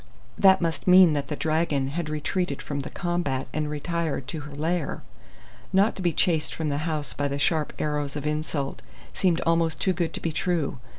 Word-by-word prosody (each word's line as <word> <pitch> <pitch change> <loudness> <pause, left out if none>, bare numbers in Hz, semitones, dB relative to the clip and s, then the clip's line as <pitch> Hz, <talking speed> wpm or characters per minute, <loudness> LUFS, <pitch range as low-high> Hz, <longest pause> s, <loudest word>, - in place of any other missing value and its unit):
That 190 -1 +5
must 165 -2 -2
mean 180 -3 +8
that 140 -1 -1
the 150 - -3
dragon 155 -3 0
had 160 +2 -3
retreated 155 0 -2
from 145 -1 -4
the 135 - -5
combat 175 -7 -2
and 155 -1 -1
retired 155 -2 -2
to 160 - -3
her 145 -1 -9
lair! 160 +1 -2 0.7
Not 195 +3 +3
to - - -6
be 175 -2 +2
chased 160 -1 +1
from 160 -2 -2
the 145 0 -1
house 150 -2 -2
by 145 - -1
the 140 0 -2
sharp 155 +1 +1
arrows 150 -2 -2
of 145 -1 -4
insult 150 -2 -2 0.3
seemed 175 -3 +1
almost 165 -1 +1
too 190 - +2
good 170 -1 -1
to - - -1
be 165 - -2
true. 165 -5 -1
155 Hz, 195 wpm, -26 LUFS, 145-175 Hz, 0.7 s, mean